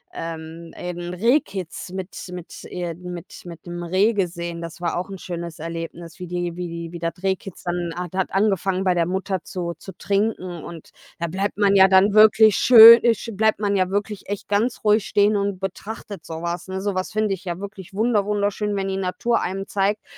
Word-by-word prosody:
ähm, 165 0 -7
eben 175 0 -5
Rehkitz 195 - -1
mit 190 0 -5 0.2
mit 180 -2 -9
äh, 175 -2 -4
mit 180 0 -9
mit 170 -1 -10
'nem 175 0 -6
Reh 190 +6 +2
gesehen. 170 -3 -3
Das 165 0 -8
war 170 -1 -2
auch 180 +2 -4
'n 195 - -7
schönes 170 -2 -6
Erlebnis, 165 +1 -7
wie 180 - -6
die 175 -1 -3
wie 180 0 -4
die 170 0 -6
wie 170 - -7
das 165 0 -2
Rehkitz 190 -1 -3
dann 175 -1 -2
hat 180 0 -5
hat 190 - -1
angefangen, 195 -2 +1
bei 185 -2 +3
der 170 -1 +1
Mutter 190 -1 -2
zu 175 -3 -4
zu 190 - -9
trinken, 195 -4 -1
und 165 -2 -10 0.3
da 170 - -1
bleibt 195 +4 -3
man 200 -1 +3
ja 190 0 +8
dann 190 +2 +5
wirklich 215 0 +6
schön, 230 -1 +10
äh, 235 -1 +4
sch 230 - -8
bleibt 220 +1 +2
man 205 -1 0
ja 185 -2 +1
wirklich 205 0 -3
echt 205 - -4
ganz 220 +4 0
ruhig 210 0 +4
stehen 205 +1 +3
und 200 -2 -1
betrachtet 195 -1 -6
so 160 +1 -7
was, 170 +1 -3
ne? 190 0 -4
So 200 -1 -1
was 185 - -2
finde 215 -2 0
ich 190 0 -8
ja 175 0 -4
wirklich 195 -2 -9
wunder-wunderschön, 210 -2 0
wenn 195 -1 -2
die 190 - -2
Natur 195 +5 0
einem 195 +2 -3
zeigt, 205 +1 0
190 Hz, 205 wpm, -22 LUFS, 175-205 Hz, 0.3 s, schön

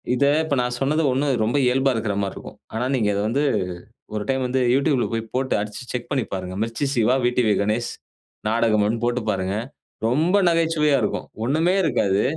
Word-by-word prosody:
இத 140 - +2 0.2
இப்ப 155 -3 -1
நான் 125 0 -2
சொன்னது 150 +4 +1
ஒன்னும் 135 +2 +1
ரொம்ப 120 +6 +1
இயல்பா 135 +2 +3
இருக்கிற 110 -2 -1
மாரி 100 -1 -2
இருக்கும். - - -10 0.2
ஆனா, 115 +2 -1
நீங்க 110 -5 +1
இத 100 - -1
வந்து 130 +6 0 0.7
ஒரு 105 - -2
டைம் 130 -1 0
வந்து 130 +1 0
You 130 - +4
Tubeல 140 -6 +2
போய் 115 0 -2
போட்டு 130 +1 0
அடிச்சு 105 +3 -5
செக் 125 -1 -4
பண்ணி 130 -4 0
பாருங்க. 95 -1 -5
மிர்ச்சி 115 +5 -2
சிவா, 120 0 +3
விடிவி 120 -3 +2
கணேஷ் 110 +3 -1 0.6
நாடகம் 110 -2 +2
ஒன் 115 +1 -1
போட்டு 120 0 0
பாருங்க. 95 0 -1 0.5
ரொம்ப 160 - +2
நகைச்சுவையா 160 -3 +2
இருக்கும். 105 - -2 0.2
ஒன்னுமே 160 +8 +2
இருக்காது. 100 - +1
125 Hz, 185 wpm, -22 LUFS, 110-140 Hz, 0.7 s, You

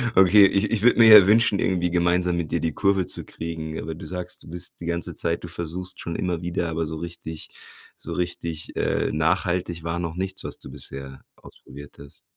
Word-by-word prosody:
Okay, 95 +2 +7
ich 100 +4 0
ich 110 -3 +1
würde 120 0 +5
mir 115 - +8
ja 95 - +3
wünschen, 110 -2 +4
irgendwie 90 -2 0
gemeinsam 90 0 +1
mit 80 -3 -3
dir 85 - +1
die 80 -2 -1
Kurve 100 -2 +1
zu - - -1
kriegen. 80 -1 -6
Aber 80 +1 -5
du - - -10
sagst, 90 -1 -7
du - - -13
bist 90 +1 -10
die 85 - -8
ganze 85 0 -3
Zeit 85 +1 -2
du - - -5
versuchst 85 +2 -5
schon 85 - -5
immer 90 -2 -2
wieder, 85 -1 -2
aber 80 0 -2
so 80 0 -5
richtig 80 -1 -7 0.5
so - - -6
richtig, 85 -3 -4
äh, - - 0
nachhaltig 85 +1 0
war 85 +1 -2
noch 85 -1 -4
nichts, 95 +1 -4
was - - -6
du - - -11
bisher 70 0 -7
ausprobiert 70 +1 -14
hast. 70 0 -13
85 Hz, 210 wpm, -24 LUFS, 80-90 Hz, 0.5 s, mir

